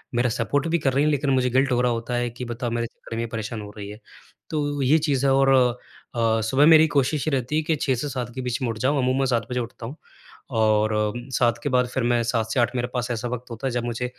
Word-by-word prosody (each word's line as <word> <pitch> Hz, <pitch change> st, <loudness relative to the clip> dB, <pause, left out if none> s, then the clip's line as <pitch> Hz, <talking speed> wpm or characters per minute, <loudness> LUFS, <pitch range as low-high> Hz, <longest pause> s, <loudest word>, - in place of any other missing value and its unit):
मेरा 120 Hz, +1 st, +2 dB
सपोर्ट 130 Hz, +6 st, -1 dB
भी 170 Hz, +1 st, +1 dB
कर 135 Hz, -3 st, 0 dB
रही 140 Hz, -, +2 dB
हैं, 150 Hz, -, +3 dB
लेकिन 145 Hz, 0 st, 0 dB
मुझे 130 Hz, -1 st, +2 dB
गिल्ट 130 Hz, +2 st, +2 dB
हो 125 Hz, -, +2 dB
रहा 125 Hz, -, +2 dB
होता 120 Hz, +1 st, -3 dB
है 120 Hz, 0 st, 0 dB
कि 120 Hz, +2 st, -7 dB
बताओ, 120 Hz, +1 st, -4 dB
मेरे 115 Hz, 0 st, -1 dB
चक्कर 115 Hz, -, -10 dB
में 115 Hz, -, -2 dB
ये -, -, -3 dB
परेशान 110 Hz, 0 st, -4 dB
हो 105 Hz, -, -8 dB
रही 100 Hz, -1 st, -7 dB
है। 105 Hz, +2 st, -10 dB, 0.5 s
तो 145 Hz, -2 st, -2 dB
ये 140 Hz, +5 st, +4 dB
चीज़ 140 Hz, -1 st, +1 dB
है 135 Hz, -, +4 dB
और 135 Hz, 0 st, +4 dB, 0.6 s
अ, 115 Hz, -1 st, +2 dB
सुबह 130 Hz, +7 st, +3 dB
मेरी 160 Hz, 0 st, +7 dB
कोशिश 140 Hz, +2 st, +1 dB
ये 155 Hz, -, +1 dB
रहती 130 Hz, +2 st, -1 dB
है 155 Hz, -, +2 dB
कि 160 Hz, 0 st, +1 dB
6 140 Hz, -2 st, 0 dB
के 125 Hz, +5 st, -3 dB
7 125 Hz, -3 st, -4 dB
बीच 125 Hz, 0 st, -3 dB
में 125 Hz, -, 0 dB
उठ 115 Hz, -, -4 dB
जाऊँ, 130 Hz, +6 st, +1 dB
अमूमन 130 Hz, +1 st, +1 dB
7 120 Hz, -3 st, 0 dB
बजे 125 Hz, -, 0 dB
उठता 120 Hz, -1 st, -6 dB
हूँ। 130 Hz, +6 st, -7 dB, 0.6 s
और 110 Hz, 0 st, +3 dB
अम, 105 Hz, +3 st, -2 dB
7 120 Hz, -2 st, +2 dB
के 145 Hz, -, 0 dB
बाद 125 Hz, -1 st, +2 dB
फिर 130 Hz, 0 st, -2 dB
मैं 120 Hz, 0 st, +2 dB
7 115 Hz, -1 st, 0 dB
से 135 Hz, -, 0 dB
8 120 Hz, +1 st, +1 dB
मेरे 120 Hz, -1 st, -1 dB
पास 125 Hz, -1 st, -1 dB
ऐसा 120 Hz, +1 st, -2 dB
वक़्त 125 Hz, 0 st, -6 dB
होता 115 Hz, +4 st, -4 dB
है -, -, -1 dB
जब 120 Hz, 0 st, -2 dB
मुझे 120 Hz, +1 st, -3 dB
125 Hz, 280 wpm, -24 LUFS, 115-135 Hz, 0.6 s, मेरी